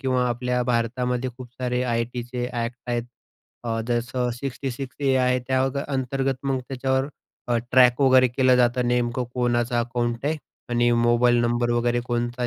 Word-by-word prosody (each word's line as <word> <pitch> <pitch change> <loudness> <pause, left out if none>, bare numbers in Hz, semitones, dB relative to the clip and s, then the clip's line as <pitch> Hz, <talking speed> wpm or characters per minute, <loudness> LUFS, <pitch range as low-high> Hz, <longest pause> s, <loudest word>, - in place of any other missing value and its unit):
किंवा 130 -1 +1
आपल्या 125 +1 -1
भारतामध्ये 125 +1 -1
खूप 130 -2 -9
सारे 125 -1 -1
आय-टी 120 0 -1
चे 125 0 -4
ॲक्ट 120 0 -3
आहेत 120 -1 -1 0.6
अ, 115 -1 -1
जसं 125 +1 -1
66 135 0 -5
ए 135 - +4
आहे 125 0 +2
त्या 130 0 +2
अ, - - +1 0.2
अंतर्गत 135 0 -1
मग 135 -1 0
त्यांच्यावर 130 0 0 0.4
अ, 120 - +2 0.2
ट्रॅक 125 0 +5
वगैरे 130 -2 +6
केलं 130 +1 +3
जातं 125 0 +3
की 120 - -2
नेमकं 120 0 0
कोणाचं 120 0 0
अकाउंट 120 +1 -2
आहे 155 +1 +1 0.3
आणि 120 0 +3
मोबाईल 120 +1 +3
नंबर 120 0 +1
वगैरे 120 0 +1
कोणता 120 0 -1
125 Hz, 165 wpm, -24 LUFS, 120-130 Hz, 0.6 s, वगैरे